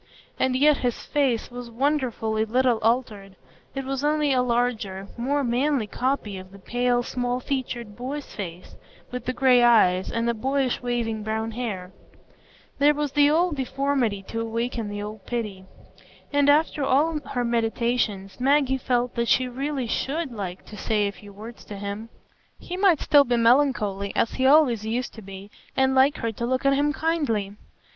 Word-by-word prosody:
And 260 Hz, -1 st, +1 dB
yet 290 Hz, +2 st, +4 dB
his 245 Hz, -2 st, -2 dB
face 260 Hz, -6 st, 0 dB
was 245 Hz, -1 st, -7 dB
wonderfully 235 Hz, -4 st, 0 dB
little 245 Hz, +1 st, +2 dB
altered,—it 225 Hz, +2 st, -3 dB
was 270 Hz, +1 st, -3 dB
only 300 Hz, -1 st, +2 dB
a 255 Hz, -, +3 dB
larger, 235 Hz, -6 st, -1 dB
more 275 Hz, +4 st, 0 dB
manly 255 Hz, +1 st, +1 dB
copy 220 Hz, -3 st, -2 dB
of 185 Hz, 0 st, -12 dB
the 200 Hz, -, -13 dB
pale, 245 Hz, +4 st, 0 dB
small 245 Hz, 0 st, -2 dB
featured 245 Hz, -5 st, -4 dB
boy's 270 Hz, +5 st, -5 dB
face, 180 Hz, -3 st, -7 dB, 0.4 s
with 250 Hz, -1 st, -5 dB
the 255 Hz, -, 0 dB
gray 255 Hz, -1 st, +4 dB
eyes, 190 Hz, -6 st, +4 dB
and 230 Hz, 0 st, -1 dB
the 235 Hz, -, +2 dB
boyish 265 Hz, +2 st, -1 dB
waving 235 Hz, -3 st, -2 dB
brown 220 Hz, +1 st, -2 dB
hair; 210 Hz, -6 st, -5 dB, 0.9 s
there 295 Hz, +1 st, +5 dB
was 295 Hz, -1 st, -2 dB
the 290 Hz, 0 st, +4 dB
old 335 Hz, +1 st, +2 dB
deformity 265 Hz, -6 st, -1 dB
to 225 Hz, +4 st, -4 dB
awaken 230 Hz, -1 st, -3 dB
the 205 Hz, 0 st, -5 dB
old 210 Hz, -1 st, -8 dB
pity; 210 Hz, -6 st, -4 dB, 0.7 s
and 285 Hz, 0 st, +4 dB
after 300 Hz, 0 st, +3 dB
all 300 Hz, +4 st, +2 dB
her 260 Hz, -4 st, -3 dB
meditations, 230 Hz, -4 st, -1 dB
Maggie 265 Hz, 0 st, +2 dB
felt 245 Hz, -1 st, 0 dB
that 235 Hz, 0 st, -1 dB
she 255 Hz, +2 st, +3 dB
really 270 Hz, +1 st, -3 dB
should 275 Hz, +5 st, -2 dB
like 190 Hz, -5 st, -6 dB
to 215 Hz, -, -11 dB
say 210 Hz, 0 st, 0 dB
a -, -, -2 dB
few 205 Hz, 0 st, -14 dB
words 220 Hz, +4 st, -11 dB
to 205 Hz, -, -8 dB
him. 205 Hz, +3 st, -5 dB, 0.5 s
He 360 Hz, -, -7 dB
might 370 Hz, -5 st, +3 dB
still 290 Hz, -1 st, +6 dB
be 245 Hz, -2 st, 0 dB
melancholy, 230 Hz, -5 st, +2 dB
as 230 Hz, -, +1 dB
he 260 Hz, 0 st, +1 dB
always 270 Hz, -7 st, +5 dB
used 235 Hz, +3 st, -2 dB
to 220 Hz, -, -10 dB
be, 195 Hz, 0 st, -10 dB, 0.3 s
and 265 Hz, 0 st, +3 dB
like 265 Hz, +2 st, +4 dB
her 230 Hz, -, -2 dB
to 235 Hz, +2 st, -4 dB
look 260 Hz, +2 st, -1 dB
at 275 Hz, -, +5 dB
him 290 Hz, +2 st, +2 dB
kindly. 285 Hz, -12 st, -1 dB
245 Hz, 170 wpm, -25 LUFS, 220-275 Hz, 0.9 s, still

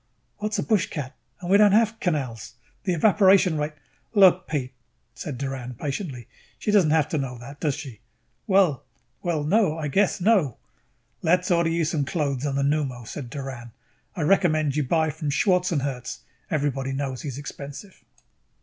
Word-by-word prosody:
"What's 210 Hz, 0 st, -2 dB
a -, -, 0 dB
bushcat? 170 Hz, -, -1 dB, 0.3 s
And 180 Hz, 0 st, -3 dB
we 200 Hz, -, +7 dB
don't 205 Hz, -1 st, +6 dB
have 220 Hz, +1 st, +3 dB
canals. 130 Hz, -, -3 dB, 0.3 s
The 185 Hz, -, +1 dB
evaporation 190 Hz, -1 st, +5 dB
rate 150 Hz, +1 st, -2 dB, 0.3 s
" -, -, -42 dB
"Look, 185 Hz, -2 st, +6 dB
Pete," 135 Hz, -4 st, -3 dB, 0.4 s
said 130 Hz, +3 st, -6 dB
Doran 130 Hz, -2 st, -5 dB
patiently. 135 Hz, -, -5 dB, 0.3 s
"She 210 Hz, -, -1 dB
don't 195 Hz, -7 st, +4 dB
have 155 Hz, -1 st, +3 dB
to 155 Hz, -, -1 dB
know 130 Hz, -2 st, -4 dB
that, 140 Hz, +5 st, -11 dB
does 150 Hz, -4 st, 0 dB
she?" 135 Hz, -7 st, -9 dB, 0.5 s
"Well 190 Hz, -, +3 dB, 0.4 s
well, 165 Hz, -4 st, -1 dB
no. 180 Hz, 0 st, +2 dB
I 150 Hz, -2 st, -3 dB
guess 195 Hz, +8 st, +2 dB
not 220 Hz, +6 st, +5 dB
No." 145 Hz, -, -2 dB, 0.6 s
"Let's 180 Hz, +3 st, +2 dB
order 170 Hz, -1 st, +3 dB
you 165 Hz, 0 st, +1 dB
some 155 Hz, -2 st, 0 dB
clothes 140 Hz, -2 st, -1 dB
on 135 Hz, -, -2 dB
the 140 Hz, -, +1 dB
pneumo," 140 Hz, -4 st, -1 dB
said 130 Hz, -2 st, -6 dB
Doran. 130 Hz, -4 st, -7 dB, 0.4 s
"I 175 Hz, -, -3 dB
recommend 155 Hz, -5 st, +2 dB
you 150 Hz, -, +1 dB
buy 160 Hz, +3 st, +1 dB
from 150 Hz, +1 st, -4 dB
Schwartzherz. 145 Hz, -, 0 dB, 0.3 s
Everybody 140 Hz, -3 st, -1 dB
knows 135 Hz, -2 st, -3 dB
he -, -, -6 dB
is 135 Hz, -2 st, -5 dB
expensive." 145 Hz, +6 st, -9 dB
150 Hz, 170 wpm, -25 LUFS, 135-180 Hz, 0.6 s, we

